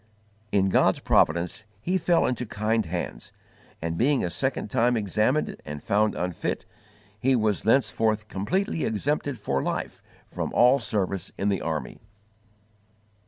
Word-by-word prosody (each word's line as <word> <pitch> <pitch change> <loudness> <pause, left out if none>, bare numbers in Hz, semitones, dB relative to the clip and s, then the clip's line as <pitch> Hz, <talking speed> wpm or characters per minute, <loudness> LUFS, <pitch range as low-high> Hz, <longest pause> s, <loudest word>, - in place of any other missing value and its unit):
In 95 -1 +3
God's - - +3
providence 85 +6 +2 0.2
he 180 - 0
fell 170 0 +3
into 125 -1 -1
kind 110 0 0
hands, 85 -8 -5 0.5
and, 85 0 -2
being 140 +2 +3
a 85 - -2
second 130 +11 -2
time 120 -1 +3
examined 110 +7 0
and 75 -1 -7
found 105 +1 +2
unfit, 90 -1 -3 0.5
he 130 +4 +3
was 110 -4 +1
thenceforth 110 -3 +2
_completely 165 - -1
exempted 140 +5 -1
for 70 -9 -1
life - - -3 0.2
from - - -4
all 125 +3 +6
service 100 -6 -2
in 100 - 0
the 100 -3 0
army. 80 -2 -3
110 Hz, 135 wpm, -26 LUFS, 95-125 Hz, 0.5 s, all